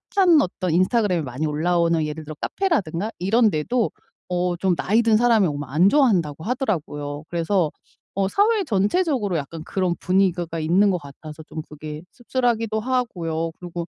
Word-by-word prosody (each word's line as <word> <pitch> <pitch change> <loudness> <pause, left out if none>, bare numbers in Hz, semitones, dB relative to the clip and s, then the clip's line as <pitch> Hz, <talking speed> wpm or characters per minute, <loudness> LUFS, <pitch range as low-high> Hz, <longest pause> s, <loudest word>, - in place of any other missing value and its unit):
핫한 355 -6 +6
어떤 185 -1 -2
인스타그램에 185 +1 +2
많이 130 +4 -4
올라오는 165 +1 +1
예를 150 +1 -5
들어 155 +1 -8
카페라든가 215 - -1
이런 220 +5 +3
데도 210 +8 0 0.4
어 180 0 0
좀 180 0 +1
나이 215 +7 +2
든 225 -2 +4
사람이 230 -5 +4
오면 145 -2 -4
안 170 +8 +4
좋아한다고 180 - +2
하더라고요. 155 - -3
그래서 170 -1 0 0.4
어 195 -1 +1
사회 415 - +2
전체적으로 210 - +1
약간 155 +2 -6
그런 185 0 -1
분위기가 175 -3 0
있는 180 +6 +3
것 180 - 0
같아서 150 +2 -11
좀 155 0 -7
그게 150 0 -8
씁쓸하기도 235 -3 -1
하고요. 175 -10 -2
그리고 175 -1 -6
180 Hz, 385 characters per minute, -22 LUFS, 160-225 Hz, 0.4 s, 핫한